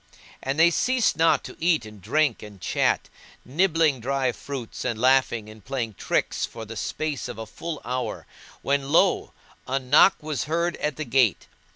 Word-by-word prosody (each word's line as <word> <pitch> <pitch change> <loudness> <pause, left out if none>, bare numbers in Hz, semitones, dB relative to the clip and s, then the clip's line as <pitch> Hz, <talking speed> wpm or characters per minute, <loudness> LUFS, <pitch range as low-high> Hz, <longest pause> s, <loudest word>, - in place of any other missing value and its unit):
And 135 +2 -2
they 170 +1 +6
ceased 250 +6 +2
not 165 +1 +3
to - - -9
eat 165 -7 +2
and 105 -2 -12
drink 135 - +1
and 105 -2 -11
chat, - - 0 0.4
nibbling 160 -1 +2
dry 130 +1 0
fruits 130 -1 -7
and 115 - -2
laughing 130 -3 +3
and 110 -1 -13
playing 125 -5 -3
tricks - - -1
for 115 -1 -5
the 115 +1 -8
space 150 +4 -3
of 120 -3 -7
a 110 - -5
full 165 +7 -6
hour 125 0 -3 0.4
when 140 0 0
lo! 180 +4 +3 0.4
a 135 - 0
knock 135 +8 +5
was 150 -5 -2
heard 170 +3 0
at 150 -2 -2
the 155 - -4
gate. 120 -5 +2
135 Hz, 175 wpm, -25 LUFS, 115-155 Hz, 0.4 s, they